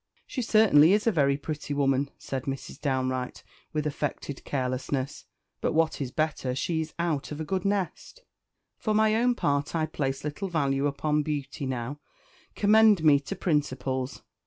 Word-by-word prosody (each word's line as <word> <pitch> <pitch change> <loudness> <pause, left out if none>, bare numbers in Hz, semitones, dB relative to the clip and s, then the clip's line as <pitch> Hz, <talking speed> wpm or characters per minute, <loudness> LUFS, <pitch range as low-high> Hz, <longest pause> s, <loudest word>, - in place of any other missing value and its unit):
"She 260 - -4
certainly 200 -8 +6
is 210 0 +2
a 230 - +4
very 140 -6 +2
pretty 145 0 -4
woman," 135 0 +2
said 135 -2 -5
Mrs. 135 -1 -5
Downe 130 -3 0
Wright 125 -1 -4 0.3
with 155 -1 -2
affected 145 -1 -3
carelessness; 130 0 -2 0.3
"but - - 0
what 160 -1 +1
is 130 - -2
better, 140 -3 -1
she 160 +4 -1
is 155 0 -7
out 165 -5 -1
of 150 - -5
a 160 - -3
good 185 +3 -1
nest. 200 - -2 0.6
For 215 -1 0
my 215 0 +4
own 240 +2 +3
part 145 -2 0
I 160 -1 +2
place 135 -3 -3
little 150 +7 -3
value 140 -5 +1
upon 150 +1 0
beauty 145 -2 -3
now; 130 +2 -4 0.6
commend 210 -3 +5
me 145 -3 +6
to 150 +8 -6
principles. 130 -6 -1
145 Hz, 165 wpm, -27 LUFS, 135-170 Hz, 0.6 s, certainly